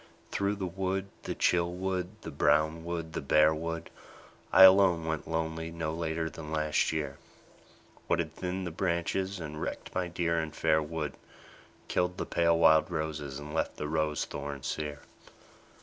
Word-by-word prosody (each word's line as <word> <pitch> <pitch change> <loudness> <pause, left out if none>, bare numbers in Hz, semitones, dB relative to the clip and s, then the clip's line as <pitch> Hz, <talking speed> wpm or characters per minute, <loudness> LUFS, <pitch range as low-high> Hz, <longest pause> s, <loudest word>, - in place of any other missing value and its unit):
Through 100 +1 0
the 100 -2 -3
wood, 95 +2 -2
the - - -4
chill 85 0 +2
wood, 95 +2 -3
the 80 - -7
brown 80 +3 +2
wood, 85 -1 -4
the - - -2
bare 75 +2 +5
wood, 80 +1 -4 0.6
I - - +9
alone 95 -3 +7
went 80 -2 -3
lonely 80 0 -2
no 80 -1 -3
later 80 0 -2
than 80 -1 -8
last 75 -1 +1
year, 75 -3 -3 0.9
What - - +2
had - - -2
thinned 90 +1 -3
the 90 - -4
branches, 95 +2 -1
and 75 -2 -6
wrecked - - -5
my 90 -1 -1
dear 85 -1 0
and 80 -1 -4
fair 80 -1 +3
wood, 75 -3 -4 0.7
Killed 90 0 0
the - - -2
pale 85 -1 +2
wild 80 -1 +5
roses 75 -3 -3
and 75 +1 -8
left 80 - -1
the 75 - -3
rose 75 -1 0
thorns 70 -1 -6
sere 75 +1 -3
80 Hz, 165 wpm, -30 LUFS, 75-90 Hz, 0.9 s, I